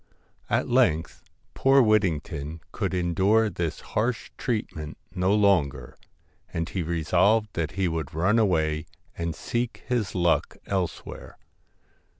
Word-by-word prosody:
At - - +1
length 80 +1 +2 0.3
poor 135 +1 +4
Whittington 85 - +1
could - - -2
endure 95 +5 +2
this 85 -4 -3
harsh 115 0 -1
treatment 95 - -3 0.2
no 90 0 +1
longer, 80 -12 +2 0.6
and 85 0 -2
he 95 - -3
resolved 90 +7 +2
that 80 -2 -2
he 95 -1 0
would 80 -3 -3
run 100 +8 +3
away 80 -6 +1 0.3
and 85 -1 -3
seek 120 0 -3
his 120 -6 -1
luck 85 -2 +1
elsewhere. 95 -4 -4
90 Hz, 120 wpm, -26 LUFS, 80-105 Hz, 0.6 s, poor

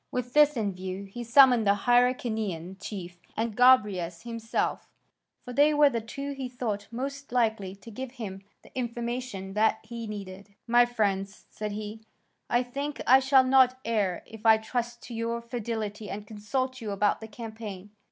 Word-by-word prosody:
With 250 0 -3
this 300 -2 +5
in 205 -3 0
view, 185 +1 -5
he 220 +5 -7
summoned 245 -2 +6
the 200 - +5
Hyrcanian 220 -6 +1
chief 175 -4 -7 0.2
and 225 -1 -1
Gobryas 205 -9 +4
himself; 230 -1 -2 0.6
for 250 - -7
they 295 +3 +4
were 295 -1 +6
the 230 -2 -1
two 275 +6 -6
he 270 -2 -5
thought 215 -5 -3
most 275 +3 -5
likely 220 -6 0
to 215 +3 -13
give 260 +3 -6
him 200 -7 -6 0.2
the - - -19
information 240 -5 -4
that 220 +1 +3
he 230 0 -7
needed. 200 -1 -8
"My 240 0 +5
friends," 200 -4 -1
said 210 -1 -4
he, 215 +1 -6 0.5
"I 240 +1 +3
think 280 +4 -5
I 260 +2 +7
shall 265 0 +5
not 255 -1 +5
err 210 -6 0
if 225 -1 -12
I 220 -1 +7
trust 235 +2 -4
to 240 - -9
your 230 +1 -2
fidelity 220 -3 -4
and 205 +1 -6
consult 255 +5 -3
you 220 - -4
about 205 +2 +1
the 220 - -7
campaign. 215 -3 -8
230 Hz, 170 wpm, -28 LUFS, 205-250 Hz, 0.6 s, I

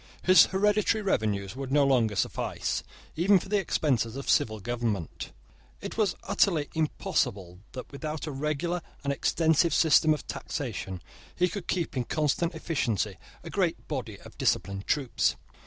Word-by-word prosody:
His 185 0 +7
hereditary 210 +2 +2
revenues 105 - 0
would 135 -1 -5
no 145 0 +4
longer 120 -6 +2
suffice, - - -1 0.3
even 190 +5 +5
for 185 - -5
the 205 0 +2
expenses 130 - 0
of 140 - -6
civil 110 -1 +2
government. 110 -6 -3 0.5
It - - -6
was 210 -5 +1
utterly 160 -7 +1
impossible 105 - -1
that, 125 - -8
without 150 +2 -5
a 155 - -4
regular 150 +5 -2 0.2
and 140 0 0
extensive 160 +3 +2
system 160 -1 +5
of 155 - -1
taxation, 100 - -5 0.3
he 180 - +3
could 195 -1 -6
keep 170 -5 -1
in 125 -2 -1
constant 155 +4 0
efficiency 115 - -1 0.2
a - - -8
great - - -1
body - - -4
of - - -14
disciplined 100 0 0
troops. 140 -5 +1
145 Hz, 150 wpm, -28 LUFS, 115-170 Hz, 0.5 s, His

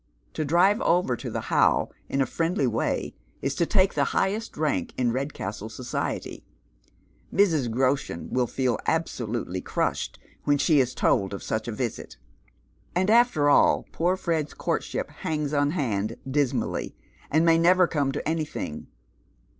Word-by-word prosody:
To 155 - -2
drive 175 +8 +3
over 170 -7 +2
to - - -6
the - - -3
How - - +3 0.2
in 135 - 0
a - - +3
friendly 165 0 0
way 115 -2 -1 0.3
is 135 - 0
to 170 +3 0
take 195 -2 +3
the - - +2
highest 210 +4 -1
rank 145 - -1
in 125 -2 +1
Redcastle 115 -5 -4
society. 120 +2 -4 0.9
Mrs 160 -11 +2
Groshen 130 - 0
will 125 -1 +1
feel 125 -3 0
absolutely 120 - -2
crushed - - -2 0.3
when 145 0 +3
she 150 0 +3
is 125 -1 +1
told 100 0 +1
of - - -8
sucli 110 +1 -2
a - - -2
visit. 120 +1 -4 0.8
And 185 +4 +2
after 230 -11 +4
all, 145 - +4
poor 180 +3 +1
Fred's 165 -5 -2
courtship - - -2
hangs 150 -2 -3
on 145 0 +2
hand 115 - -1
dis 135 -1 +1
mally, - - -3 0.3
and 160 +3 +3
may 165 0 +5
never 180 +2 +5
come 145 -5 0
to - - -4
anything. 155 - -3
145 Hz, 155 wpm, -26 LUFS, 120-170 Hz, 0.9 s, may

